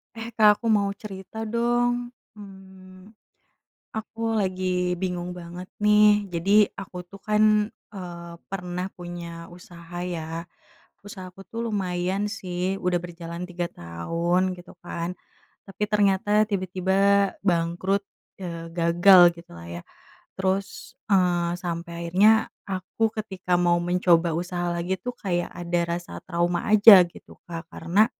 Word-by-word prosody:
Eh, 225 +1 -6
Kak 210 +1 +6
aku - - -4
mau 200 -2 +2
cerita 200 +1 -8
dong, 240 +2 0 0.2
mmm, 190 -1 -14 0.8
aku 225 +1 -3
lagi 185 -1 -1
bingung 180 -1 -3
banget 180 +1 -8
nih 210 0 +5
jadi 190 +5 +3 0.2
aku 190 -2 -9
tuh 195 +2 -14
kan, 215 0 +3 0.2
eee, 170 -3 -8 0.2
pernah 180 -1 -4
punya 170 -1 -7
usaha 175 0 -10
ya, 165 -1 -5 0.6
usaha 190 -2 -8
aku 195 - -14
tuh 230 0 -4
lumayan 190 -1 -1
sih 185 -4 -3
udah 180 -1 +2
berjalan 170 0 -7
3 175 -1 -3
tahun 170 - -1
gitu 175 - -13
kan, 170 0 -4 0.5
tapi 195 +2 -5
ternyata 205 0 +3
tiba-tiba 190 -1 -1 0.5
bangkrut, 175 +3 +1 0.4
eee, 170 -2 -6
gagal 175 +2 +6 0.2
gitulah 85 - -12
ya 85 0 -7 0.5
terus, 190 +1 -2 0.2
eee, 175 -3 +2
sampai 170 -1 -5
akhirnya 195 +6 +6 0.4
aku 195 +4 -1
ketika 185 -4 -1
mau 175 -1 +3
mencoba 175 -1 +3
usaha 175 0 -2
lagi 175 +2 -2
tuh 245 0 -4
kayak 175 -3 -2
ada 175 0 -2 0.2
rasa 175 - -11
trauma 175 0 0
aja 210 -2 +10
gitu - - -16
Kak 165 0 -7
karena, 180 +6 +3
180 Hz, 125 wpm, -25 LUFS, 175-200 Hz, 0.8 s, aja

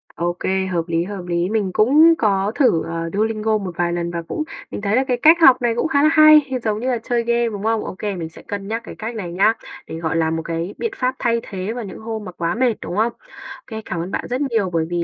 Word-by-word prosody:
Ô 175 +1 -1
kê, 190 0 0
hợp 175 -3 -1
lý, 165 0 0
hợp 195 -1 -6
lý. 175 +1 0
Mình 210 -4 0
cũng 300 +9 +6
có 200 -2 +1
thử, 250 - +3
ờ, 165 0 -4
Duolingo 215 +1 0
một 195 -3 -5
vài 175 -1 0
lần 170 0 -2
và 170 - -3
cũng 305 - -2 0.3
mình - - -5
thấy 205 +1 0
là 260 - +3
cái 250 - +1
cách 320 +7 +6
học 260 -5 +7
này 235 -1 +1
cũng 240 - 0
khá 280 -2 +2
là 305 - +6
hay, 310 -1 +8 0.2
giống 215 -1 -1
như 250 - -3
là 245 - 0
chơi 235 +1 -1
game, 235 0 +1
đúng 205 -2 -6
không? 225 0 0
Ô - - -6
kê, 205 -2 -2
mình 165 -3 -5
sẽ 160 - -14
cân 200 -1 -6
nhắc 225 +2 -3
cái - - -9
cách 225 +2 -6
này 185 -6 -5
nhá, 195 +5 +3 0.3
để - - -6
gọi 160 -1 -2
là 160 -1 +1
một 165 0 -1
cái 165 +3 -3
biện 460 - -2
pháp 255 -5 -1
thay 235 -1 +1
thế 195 +2 -5
vào 245 - -5
những 190 - -9
hôm 220 -1 -5
mà 180 - -7
quá 170 0 -2
mệt, 245 -1 +2
đúng - - -5
không? 225 +3 +1
Ô - - -38 0.5
kê, 220 -2 -6
cảm 170 - -4
ơn 180 +3 -5
bạn - - -3
rất 250 +3 -2
nhiều 230 -9 0
bởi 160 -1 +1
vì 175 -1 -1
210 Hz, 285 wpm, -20 LUFS, 175-235 Hz, 0.5 s, hay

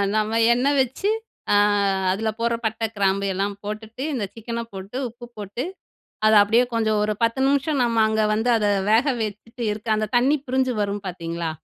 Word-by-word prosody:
நம்ம 215 +1 +1 0.2
எண்ணெய் 275 +4 +1
வச்சு 265 - -1 0.4
அ - - +5 0.6
அதுல 220 +3 -1
போடுற 235 0 +1
பட்டை, 220 +1 -1
கிராம்பு 200 0 +1
எல்லாம் 200 +2 -1
போட்டுட்டு 220 +4 -6
இந்த 245 -6 -2
சிக்கன்ன 230 +1 -5
போட்டு, 195 +5 -7
உப்பு 240 +1 -12
போட்டு 205 +4 -5 0.6
அத 215 - +5
அப்படியே 225 +4 +3
கொஞ்சம் 220 -2 +1
ஒரு 210 0 0
10 230 +3 +1
நிமிஷம் 280 +1 +1
நம்ப 230 -2 +1
அங்க 220 0 +1
வந்து 225 +3 0
அத 215 - +1 0.3
வேக 230 +6 +4 0.2
வச்சுட்டு 220 +3 -5
இருக்க, 210 +2 -7
அந்த 215 0 -1
தண்ணீ 260 +5 +4
பிரிஞ்சு 260 0 +1
வரும் 205 0 -2
பாத்தீங்களா? 170 -2 -4
220 Hz, 170 wpm, -23 LUFS, 205-240 Hz, 0.6 s, அ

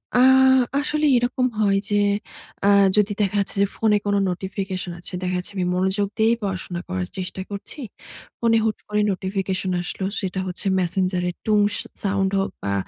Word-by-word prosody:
আ - - +5 0.6
আসলে 300 +1 0
এরকম 245 +1 +1
হয় 200 -2 +3
যে 205 - +1 0.7
আ - - +4 0.3
যদি 210 0 +3
দেখা 200 0 0
যাচ্ছে 200 - -1
যে, - - +5
ফোনে 215 -2 +3
কোনো 205 0 +2
নোটিফিকেশন 190 0 -4
আছে, 180 - -6
দেখা 180 0 -1
যাচ্ছে 180 - -4
আমি 185 -2 0
মনোযোগ 190 +2 +1
দিয়েই 225 +1 +4
পড়াশোনা 185 -2 -3
করার 185 0 -3
চেষ্টা 190 0 -4
করছি। 205 +8 -7 0.6
ফোনে 230 -1 +3
হুট 220 -2 0
করে 210 0 +1
নোটিফিকেশন 190 0 -2
আসলো। 190 +2 -4
সেটা 190 -1 -3
হচ্ছে 180 +2 -5
Messenger 185 0 +1
এর 175 - -6
টুং 215 -1 +3 0.2
স - - -1 0.3
সাউন্ড 195 -1 +1
হোক 195 - -1
বা, 100 - -1
195 Hz, 170 wpm, -23 LUFS, 185-210 Hz, 0.7 s, আ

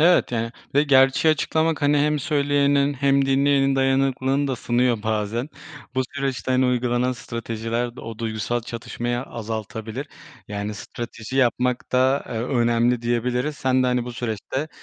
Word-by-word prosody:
Evet, 175 -4 +4
yani, 115 -1 -1 0.2
ve 145 - +5
gerçeği 135 +2 +5
açıklamak, 160 +1 0
hani, 145 0 +4
hem 150 +1 +2
söyleyenin 140 0 +2
hem 140 0 +2
dinleyenin 135 0 +3
dayanıklılığını 135 +1 +1
da 130 - -1
sınıyor 120 -2 +1
bazen. 110 +4 -1 0.5
Bu 130 - +2
süreçte, 135 -2 -2
hani, 130 0 +3
uygulanan 125 0 +1
stratejiler 115 0 -4
de - - -8
o 115 -1 -8
duygusal 115 +1 -2
çatışmayı 120 +1 -4
azaltabilir. 110 +3 -5 0.4
Yani 105 +1 -4
strateji 115 +4 -7
yapmak 125 -1 +1
da, 130 +2 +3
eee, - - -6
önemli 120 -1 +2
diyebiliriz. 125 +4 -1
Sen 130 0 +2
de, 125 - +2
hani, 125 -1 +1
bu 125 - -6
süreçte 120 +5 -3
125 Hz, 145 wpm, -23 LUFS, 115-140 Hz, 0.5 s, ve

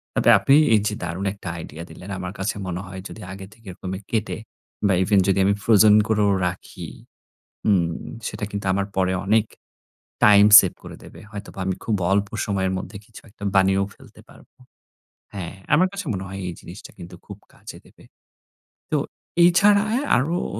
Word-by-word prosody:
তবে - - +3
আপনি 135 - +4 0.2
এই 110 - +5
যে 105 - -2
দারুণ 85 +3 -4
একটা 100 -2 -11
আইডিয়া 85 0 -8
দিলেন, 90 - -11
আমার 90 0 -6
কাছে 95 +1 -2
মনে 90 0 -4
হয় 95 0 -8
যদি 110 - -11
আগে 95 0 -8
থেকে 115 -1 -21
এরকমে 95 +1 -6
কেটে, 110 -2 -1 0.5
বা 95 - +2
ইভেন 100 +2 +3
যদি 95 0 +2
আমি 100 - +3
ফ্রোজেন 105 -1 +6
করেও 105 -2 +2 0.2
রাখি। 90 0 -7 0.8
উম 95 -5 +3 0.4
সেটা - - -7
কিন্তু 100 -1 -5
আমার 100 0 0
পরে 95 -1 +1
অনেক 110 +2 +3 0.8
টাইম 105 -1 +7
সেভ 95 -4 0
করে - - -9
দেবে। - - -13
হয়তোবা 100 -1 -9
আমি 95 -1 -1
খুব 110 - 0 0.2
অল্প 100 +1 +2 0.2
সময়ের 95 -2 -1
মধ্যে 95 +2 -7
কিছু 110 - -14
একটা 100 0 -14
বানিয়েও 95 0 +3
ফেলতে - - -17
পারব। - - -18 0.9
হ্যাঁ, 95 -3 -6 0.2
আমার 180 +5 +4
কাছে 200 0 -5
মনে 95 -1 -4
হয় 95 +1 -7
এই 90 - -4
জিনিসটা 90 +4 -12
কিন্তু 90 0 -10
খুব - - -10 0.2
কাজে - - -11
দেবে। - - -20 0.9
তো - - +2 0.5
এছাড়া 200 +4 +5 0.3
আরো 145 +8 0 0.2
অ - - -3
100 Hz, 175 wpm, -22 LUFS, 95-105 Hz, 0.9 s, টাইম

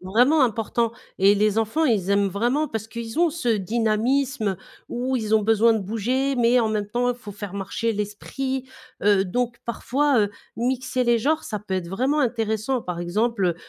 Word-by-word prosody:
vraiment 245 - +4
important 230 0 -1 0.3
et 195 +2 +6
les 210 +1 +2
enfants, 225 +9 +1
ils 210 - +1
aiment 200 0 +3
vraiment 240 +10 0
parce 220 -3 -4
qu'ils 230 +3 -6
ont 340 -1 +4
ce 310 -5 -3
dynamisme, 225 +3 +1
heu, 190 - -4 0.3
où 255 +2 -1
ils 220 -2 0
ont 215 - +4
besoin 225 +2 +4
de 220 - 0
bouger 245 +7 -1
mais 240 +1 +4
en 225 - +1
même 210 -1 -1
temps, 245 +4 0
il 245 - -4
faut 215 -4 -10
faire 200 -1 -7
marcher 200 +3 -2
l'esprit, 260 +6 -4 0.3
heu, 200 -1 +4
donc 240 +5 -1
parfois, 260 +3 +1
heu, 205 -1 +1 0.3
mixer 255 +1 -1
les 240 -1 +3
genres, 305 +7 +1
ça 210 - -4
peut 200 -1 -5
être 180 -2 -3
vraiment 260 - 0
intéressant, 225 0 0
par 175 -1 -4
exemple, 205 +4 0
heu, 175 - +1
225 Hz, 195 wpm, -23 LUFS, 205-250 Hz, 0.3 s, et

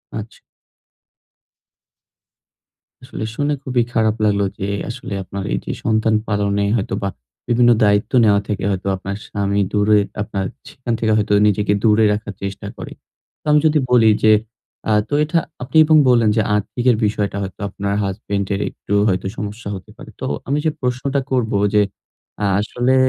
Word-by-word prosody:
আচ্ছা। 110 0 -7 2.6
আসলে - - -6
শুনে 145 +3 0
খুবই 125 -2 +1
খারাপ 110 -2 +2
লাগলো 100 -1 +2 0.2
যে 95 - -2 0.2
আসলে 115 -3 -6
আপনার 95 +1 -6
এই - - 0
যে - - -3
সন্তান 110 0 +2
পালনে 100 -1 0
হয়তোবা 100 -2 -2 0.4
বিভিন্ন 120 0 +4
দায়িত্ব 105 0 +2
নেওয়া 100 -2 +4
থেকে 100 -2 -3
হয়তো 95 0 -3
আপনার 100 +1 -5
স্বামী 100 0 -1
দূরে 105 0 +3 0.2
আপনার 100 -2 -3 0.2
সেখান 120 -2 -4
থেকে 110 -1 +1
হয়তো 105 -1 +1
নিজেকে 105 0 +1
দূরে 110 -1 +4
রাখার 105 -1 -5
চেষ্টা 100 0 -5
করে। - - -8 0.5
তো - - -68
আমি 150 - +6
যদি 155 0 +3
বলি 115 -3 +6
যে 110 - +6 0.6
আ - - +4 0.2
তো - - -5
এটা 155 +3 +1 0.2
আপনি 130 +5 -1
এবং 155 0 +5
বললেন 115 -3 +4
যে - - +4
আর্থিকের 120 +4 +1
বিষয়টা 105 -1 -1
হয়তো 95 - -8
আপনার 100 0 -3
হাসব্যান্ড 100 0 -3
এর 100 - -1
একটু - - -7
হয়তো 95 -1 0
সমস্যা 105 +1 -5
হতে 95 -3 -11
পারে। - - -11
তো - - -2 0.2
আমি 140 +2 +1
যে 155 - +3
প্রশ্নটা 130 +2 -1
করব 125 -4 +1 0.2
যে, 105 - +5 0.6
আ - - +2
আসলে 120 +5 0
105 Hz, 160 wpm, -19 LUFS, 100-120 Hz, 2.6 s, আমি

